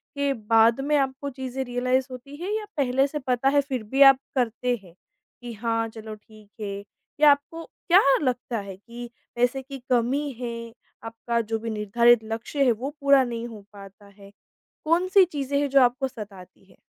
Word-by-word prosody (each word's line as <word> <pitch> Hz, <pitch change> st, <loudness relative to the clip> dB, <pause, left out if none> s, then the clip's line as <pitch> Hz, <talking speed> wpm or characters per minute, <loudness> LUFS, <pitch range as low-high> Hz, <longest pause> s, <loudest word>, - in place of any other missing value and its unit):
के 280 Hz, 0 st, 0 dB
बाद 225 Hz, +2 st, +3 dB
में 295 Hz, +2 st, 0 dB
आपको 275 Hz, 0 st, -2 dB
चीज़ें 265 Hz, 0 st, -5 dB
रियलाइज़ 255 Hz, +1 st, 0 dB
होती 265 Hz, +3 st, -10 dB
हैं 360 Hz, +5 st, -5 dB
या 430 Hz, 0 st, -2 dB
पहले 270 Hz, 0 st, +2 dB
से 300 Hz, +2 st, -5 dB
पता 255 Hz, 0 st, 0 dB
है 285 Hz, 0 st, +3 dB
फ़िर 265 Hz, -4 st, -4 dB
भी 265 Hz, +6 st, -2 dB
आप 260 Hz, -, -6 dB, 0.2 s
करते 245 Hz, 0 st, 0 dB
हैं 175 Hz, -3 st, -17 dB, 0.5 s
कि 240 Hz, -1 st, -7 dB
हाँ 225 Hz, +1 st, -1 dB
चलो 220 Hz, -1 st, -9 dB
ठीक 215 Hz, -1 st, -19 dB
है। 200 Hz, -1 st, -5 dB, 0.4 s
या 300 Hz, -1 st, +8 dB
आपको 310 Hz, +4 st, -2 dB
क्या 370 Hz, +3 st, +2 dB, 0.2 s
लगता 245 Hz, -3 st, -2 dB
है 200 Hz, -2 st, -8 dB
कि 235 Hz, +4 st, -10 dB, 0.3 s
पैसे 245 Hz, +2 st, +1 dB
की 275 Hz, +1 st, -9 dB
कमी 255 Hz, +5 st, +1 dB
है? 230 Hz, -2 st, -6 dB, 0.3 s
आपका 230 Hz, +1 st, -3 dB
जो 225 Hz, 0 st, -3 dB
भी 230 Hz, +1 st, -5 dB
निर्धारित 225 Hz, +2 st, +3 dB
लक्ष्य 225 Hz, +6 st, -2 dB
है 250 Hz, -, +4 dB
वो 240 Hz, +5 st, -3 dB
पूरा 280 Hz, -1 st, +5 dB
नहीं 235 Hz, -1 st, -5 dB
हो 220 Hz, -3 st, -10 dB
पाता 200 Hz, 0 st, -14 dB
है। 200 Hz, 0 st, -17 dB, 0.5 s
कौन-सी 370 Hz, +4 st, +4 dB
चीज़ें 285 Hz, -4 st, -2 dB
हैं 285 Hz, 0 st, 0 dB
जो 275 Hz, 0 st, +5 dB
आपको 250 Hz, +2 st, +2 dB
सताती 200 Hz, -7 st, -12 dB
हैं? 190 Hz, -, -23 dB
245 Hz, 185 wpm, -25 LUFS, 225-275 Hz, 0.5 s, या